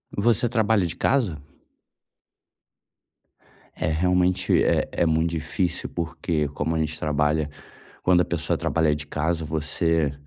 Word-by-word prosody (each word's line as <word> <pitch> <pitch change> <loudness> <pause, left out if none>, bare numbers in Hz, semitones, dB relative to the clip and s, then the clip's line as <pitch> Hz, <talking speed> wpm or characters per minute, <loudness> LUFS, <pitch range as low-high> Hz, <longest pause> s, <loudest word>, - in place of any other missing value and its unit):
Você 115 +3 +2
trabalha 110 -4 +2
de 85 0 -4
casa? 110 - 0 2.3
É, - - -3
realmente 90 +3 +2
é - - +2
é 85 - +1
muito 80 +1 +2
difícil 85 +2 -2
porque, 80 -2 -2
como 75 +3 -2
a - - 0
gente 80 0 -2
trabalha 75 0 0 0.5
quando 90 -1 +4
a - - +1
pessoa 85 -2 -1
trabalha 80 -2 +1
de 75 0 -7
casa, 80 +2 -1
você, 80 0 0
80 Hz, 130 wpm, -24 LUFS, 75-90 Hz, 2.3 s, quando